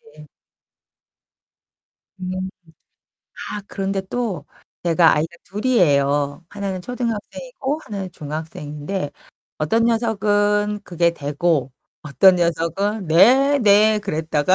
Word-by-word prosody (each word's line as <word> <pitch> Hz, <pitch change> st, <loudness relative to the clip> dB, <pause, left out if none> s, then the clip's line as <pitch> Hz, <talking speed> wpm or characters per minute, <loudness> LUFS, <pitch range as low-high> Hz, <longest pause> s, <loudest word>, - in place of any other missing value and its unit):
네. 150 Hz, 0 st, -14 dB, 1.9 s
음. 185 Hz, 0 st, -4 dB, 1.0 s
아 210 Hz, -, -5 dB
그런데 195 Hz, 0 st, -2 dB
또 190 Hz, -6 st, -3 dB, 0.4 s
제가 170 Hz, -1 st, +5 dB
아이가 160 Hz, +3 st, -2 dB
둘이에요. 145 Hz, -, +1 dB
하나는 195 Hz, -2 st, -4 dB
초등학생이고 250 Hz, -, -4 dB
하나는 195 Hz, -3 st, -5 dB
중학생인데 150 Hz, +1 st, -5 dB, 0.5 s
어떤 225 Hz, +10 st, +1 dB
녀석은 210 Hz, -2 st, +1 dB
그게 170 Hz, -1 st, +1 dB
되고 145 Hz, -2 st, -1 dB, 0.3 s
어떤 150 Hz, +6 st, +5 dB
녀석은 175 Hz, +4 st, -1 dB
"네 260 Hz, -, +5 dB
네." 215 Hz, -1 st, +5 dB
그랬다가 160 Hz, -2 st, 0 dB
190 Hz, 220 characters per minute, -21 LUFS, 160-210 Hz, 1.9 s, 제가